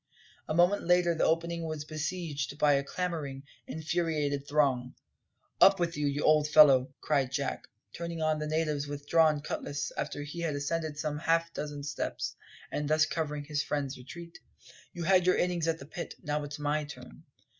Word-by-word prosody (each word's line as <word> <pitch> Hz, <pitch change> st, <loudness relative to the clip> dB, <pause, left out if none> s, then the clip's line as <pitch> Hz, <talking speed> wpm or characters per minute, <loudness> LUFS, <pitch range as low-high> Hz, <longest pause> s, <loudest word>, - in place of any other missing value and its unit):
A 155 Hz, -, -1 dB
moment 175 Hz, +4 st, +4 dB
later 175 Hz, 0 st, +3 dB
the 160 Hz, -, +1 dB
opening 170 Hz, +1 st, 0 dB
was 155 Hz, -2 st, -4 dB
besieged 155 Hz, -3 st, -3 dB
by 150 Hz, -1 st, +4 dB
a 140 Hz, 0 st, +2 dB
clamouring, 150 Hz, -4 st, -4 dB, 0.2 s
infuriated 155 Hz, -3 st, -1 dB
throng. 135 Hz, -4 st, +1 dB, 0.7 s
"Up 195 Hz, -1 st, +7 dB
with 170 Hz, -1 st, 0 dB
you, 145 Hz, 0 st, -1 dB
old 155 Hz, -1 st, +4 dB
fellow!" 140 Hz, -4 st, +6 dB
cried 140 Hz, -4 st, +1 dB
Jack, 140 Hz, -1 st, -3 dB, 0.3 s
turning 170 Hz, -1 st, -5 dB
on 155 Hz, -1 st, +1 dB
the 150 Hz, -, -3 dB
natives 155 Hz, -2 st, -1 dB
with 145 Hz, 0 st, -7 dB
drawn 155 Hz, -2 st, +4 dB
cutlass 145 Hz, -1 st, -4 dB
after 145 Hz, -, -3 dB
he 150 Hz, +4 st, -7 dB
had 165 Hz, -3 st, -1 dB
ascended 155 Hz, +1 st, -2 dB
some 150 Hz, -1 st, -2 dB
half 165 Hz, 0 st, +1 dB
dozen 145 Hz, -1 st, -5 dB
steps, 140 Hz, 0 st, -3 dB, 0.4 s
and 150 Hz, 0 st, -2 dB
thus 155 Hz, 0 st, +4 dB
covering 150 Hz, -3 st, -3 dB
his 150 Hz, 0 st, -1 dB
friend's 145 Hz, -2 st, -2 dB
retreat. 170 Hz, +7 st, -10 dB, 0.5 s
"You 175 Hz, -, -6 dB
had 185 Hz, 0 st, +4 dB
your 185 Hz, -, +4 dB
innings 175 Hz, -2 st, 0 dB
at 165 Hz, -1 st, +1 dB
the 140 Hz, -, -10 dB
pit; 170 Hz, +4 st, -7 dB
now 150 Hz, -1 st, -1 dB
it's 145 Hz, 0 st, -6 dB
my 150 Hz, +1 st, 0 dB
turn." 145 Hz, -, -11 dB
150 Hz, 175 wpm, -30 LUFS, 145-165 Hz, 0.7 s, Up